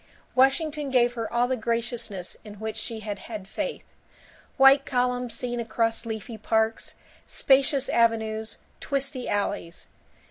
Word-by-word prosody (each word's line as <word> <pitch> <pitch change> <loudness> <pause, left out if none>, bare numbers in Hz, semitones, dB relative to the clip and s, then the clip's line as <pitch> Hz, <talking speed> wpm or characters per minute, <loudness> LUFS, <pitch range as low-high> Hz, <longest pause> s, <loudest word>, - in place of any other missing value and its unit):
II - - -31 0.3
Washington 285 +3 +2
gave 245 -2 +3
her 225 -2 -4
all 240 +1 +2
the 260 - +1
graciousness 230 -5 -3
in 210 -1 -10
which 220 +1 -4
she 220 0 -4
had 205 -2 -4
had 205 -1 -7
faith: - - -4 0.7
white 270 0 +7
columns 250 -1 0
seen 245 -1 -3
across 230 0 0
leafy 220 0 -5
parks, 220 +1 0 0.3
spacious 275 0 +3
avenues, 220 -1 +1 0.2
twisty 275 -2 -2
alleys. 195 -4 -2
235 Hz, 135 wpm, -26 LUFS, 220-255 Hz, 0.7 s, white